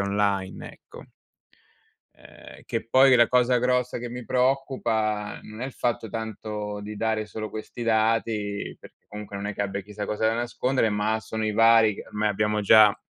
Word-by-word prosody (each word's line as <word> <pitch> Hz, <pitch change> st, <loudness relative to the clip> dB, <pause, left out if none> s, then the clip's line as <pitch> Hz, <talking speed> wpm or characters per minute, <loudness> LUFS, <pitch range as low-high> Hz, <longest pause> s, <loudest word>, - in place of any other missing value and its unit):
online, 100 Hz, -1 st, -1 dB
ecco. -, -, -14 dB, 1.1 s
Ehm, -, -, -15 dB
che 115 Hz, -, -4 dB
poi 130 Hz, +1 st, +6 dB
la 120 Hz, -1 st, +6 dB
cosa 125 Hz, 0 st, +3 dB
grossa 125 Hz, 0 st, 0 dB
che 120 Hz, 0 st, -5 dB
mi 125 Hz, 0 st, -7 dB
preoccupa, 120 Hz, -5 st, 0 dB
non 110 Hz, +2 st, -11 dB
è -, -, -2 dB
il 135 Hz, -, -8 dB
fatto 115 Hz, -2 st, -2 dB
tanto 105 Hz, -1 st, -5 dB
di 105 Hz, +1 st, -7 dB
dare 110 Hz, -1 st, -1 dB
solo 110 Hz, 0 st, -6 dB
questi 110 Hz, +2 st, -7 dB
dati, 110 Hz, -2 st, 0 dB
perché -, -, -17 dB
comunque 105 Hz, -1 st, -9 dB
non 100 Hz, +1 st, -4 dB
è 105 Hz, -, -4 dB
che 100 Hz, -, -2 dB
abbia 100 Hz, 0 st, -3 dB
chissà 105 Hz, +1 st, -7 dB
cosa 105 Hz, +1 st, -1 dB
da 115 Hz, -, +1 dB
nascondere, 120 Hz, 0 st, 0 dB
ma 105 Hz, +2 st, 0 dB
sono 110 Hz, 0 st, -4 dB
i 110 Hz, -, 0 dB
vari, 115 Hz, -1 st, +5 dB
ormai 105 Hz, 0 st, -1 dB
abbiamo 105 Hz, +1 st, 0 dB
già 105 Hz, 0 st, +6 dB
110 Hz, 175 wpm, -25 LUFS, 105-115 Hz, 1.1 s, poi